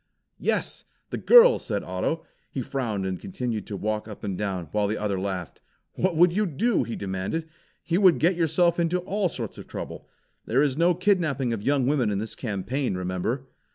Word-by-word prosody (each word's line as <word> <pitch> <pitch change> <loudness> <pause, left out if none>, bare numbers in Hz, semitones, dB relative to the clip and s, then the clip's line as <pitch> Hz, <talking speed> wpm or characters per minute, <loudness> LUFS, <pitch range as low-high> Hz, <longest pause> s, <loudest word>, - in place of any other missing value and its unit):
"Yes! - - -1 0.3
The - - -3
girl!" 485 0 +8
said - - -2
Otto. - - -2 0.2
He - - -4
frowned 110 -8 -2
and 95 -1 -3
continued 125 - -4
to 100 - -4
walk 105 +2 -2
up 105 - -10
and 100 - -2
down, 95 -3 -2
while 105 -1 +1
the 105 +2 -1
other 100 -2 -1
laughed. 95 -3 -4 0.3
"What 185 -3 0
would 175 +1 +6
you?" 210 - +1
he 115 - -5
demanded. 100 - -3 0.4
"You 175 +3 +1
would 185 -4 +6
get 175 +4 +3
yourself 170 +1 +2
into 170 +1 +2
all 195 +1 0
sorts 115 -8 -6
of - - -10
trouble. - - -7 0.4
There 130 +5 +3
is 140 -3 +1
no 170 +3 +3
kidnapping 165 - +1
of 110 - -3
young 135 +2 +2
women 130 -5 +2
in 100 - -1
this 110 +2 -4
campaign, 120 +2 -2
remember!" 95 +8 -2
130 Hz, 190 wpm, -26 LUFS, 105-170 Hz, 0.4 s, girl